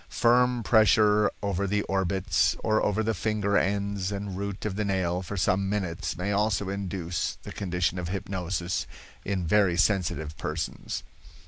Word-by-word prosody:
Firm 125 0 +3
pressure 105 0 +5
over 100 0 0
the 105 +1 0
orbits, 95 0 +1
or 110 0 +2
over 105 +2 +1
the 110 +1 0
finger 105 0 0
ends 100 -1 0
and 100 -1 -4
root 100 +1 -4
of 105 -3 -2
the 105 - -1
nail 95 -3 0
for 100 +2 -6
some 95 +1 +1
minutes 95 -3 -2
may 95 +3 -1
also 100 -1 +1
induce 95 -3 -3
the - - -8
condition 90 -1 -1
of 85 -1 -4
hypnosis 90 -1 -2 0.4
in 95 -3 -2
very 95 0 +3
sensitive 85 -6 +1
persons. 75 +1 -4
100 Hz, 150 wpm, -27 LUFS, 90-105 Hz, 0.4 s, pressure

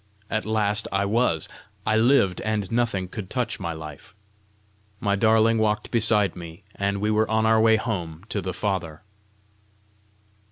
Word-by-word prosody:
At 110 0 -1
last 105 -1 0
I 100 +1 +1
was! 105 -7 +1 0.4
I 110 - +2
lived, 110 -5 +3
and 105 -2 -2
nothing 115 -6 0
could 95 0 -7
touch 125 -2 -2
my 85 -3 -3
life! 80 +5 -10 0.8
My 100 0 +1
darling 110 +1 +3
walked 105 -1 0
beside 110 -3 +2
me, 85 +1 -10
and 100 0 -1
we 105 +1 0
were 110 +1 +2
on 110 0 +2
our 110 0 +4
way 110 0 +5
home 90 -8 -4
to 100 - -2
the 95 - -4
Father! 90 -4 -3
105 Hz, 155 wpm, -24 LUFS, 95-110 Hz, 0.8 s, way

